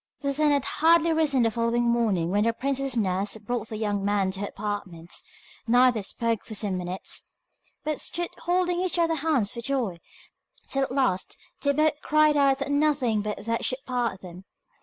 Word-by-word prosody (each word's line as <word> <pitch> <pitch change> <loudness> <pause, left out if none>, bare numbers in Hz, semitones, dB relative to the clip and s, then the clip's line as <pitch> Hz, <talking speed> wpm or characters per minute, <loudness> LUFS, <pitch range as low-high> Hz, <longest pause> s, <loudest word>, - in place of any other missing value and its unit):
The 280 -1 0
sun 300 +2 +2
had 285 -2 +2
hardly 330 +1 +4
risen 295 -6 +2
the 225 - +2
following 230 +1 0
morning 220 -8 +1
when 205 +2 +2
the 230 - +2
princess's 270 0 -1
nurse 195 0 0
brought 225 +1 -4
the 215 - -5
young 205 -2 -1
man 200 -2 +1
to 190 - -5
her 205 - -2
apartments. 195 -6 -6 0.5
Neither 245 -1 +4
spoke 230 +2 -1
for 220 - -8
some 200 -3 -1
minutes, 180 +1 -5 0.5
but 305 -1 -2
stood 345 0 -2
holding 355 0 +1
each 370 -1 0
other's 330 -2 +1
hands 275 -9 +1
for 235 - -6
joy, 235 -8 -1 0.7
till 275 - -1
at 270 - -1
last 255 -9 0 0.2
they 280 +1 +2
both 305 +1 +1
cried 305 0 +3
out 275 -2 +4
that 280 +1 -3
nothing 285 -7 +2
but 210 0 -5
death 230 0 -1
should 265 +2 -2
part 240 -6 -2
them. 180 +1 -11
240 Hz, 185 wpm, -26 LUFS, 205-285 Hz, 0.7 s, hardly